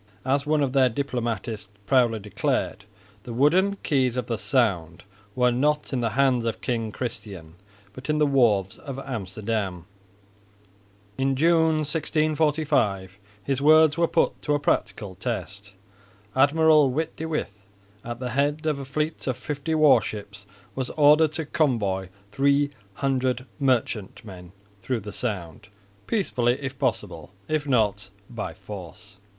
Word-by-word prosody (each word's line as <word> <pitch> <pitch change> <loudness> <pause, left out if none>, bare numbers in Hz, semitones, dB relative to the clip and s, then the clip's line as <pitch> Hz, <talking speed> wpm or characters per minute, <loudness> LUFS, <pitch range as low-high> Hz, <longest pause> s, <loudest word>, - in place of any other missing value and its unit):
As 140 +2 +1
one 150 -1 +2
of 135 -2 -1
their 130 -2 +4
diplomatists 120 -5 -3 0.2
proudly 120 -2 +3
declared, 105 0 -2 0.4
"the 120 - -8
wooden 180 +10 +3
keys 130 -4 +1
of 125 - -1
the 115 0 -2
Sound 90 - 0 0.3
were 125 -1 +3
not 150 +4 0
in 125 - 0
the 115 - +1
hands 130 -3 +3
of 115 -1 -2
King 115 -3 -2
Christian, 105 -9 -6 0.4
but 130 +3 -10
in 150 - +2
the 150 - +4
wharves 110 -9 +2
of 135 -2 -7
Amsterdam." 105 -7 -4 1.3
In 135 0 +1
June, 160 +1 +3
1645, 150 - 0 0.2
his 135 -1 -1
words 155 0 +6
were 170 0 +2
put - - +1
to 150 - +1
a - - 0
practical 105 -7 -1
test. 105 -1 -5 0.6
Admiral 150 +1 +5
Witte 155 +5 -2
de 160 - -4
With 155 -9 -2 0.5
at 120 0 -6
the 125 -1 -4
head 145 +4 0
of 150 -3 0
a 135 - -6
fleet 150 +4 -3
of 130 -2 -1
fifty 145 +4 -3
war 155 -3 +6
ships 100 -1 -8 0.3
was 130 -2 -3
ordered 150 +1 +5
to 160 +1 -3
convoy 105 - 0 0.2
300 130 -1 0
merchantmen 105 -7 -2 0.3
through 120 +3 -2
the 105 +1 -8
Sound, 95 -5 -4 0.4
peacefully 125 - +1
if 135 -1 -6
possible, 100 - -2 0.2
if 155 -1 -1
not, 105 -6 +1 0.2
by 110 -3 -5
force. 100 +1 -10
130 Hz, 140 wpm, -25 LUFS, 105-145 Hz, 1.3 s, words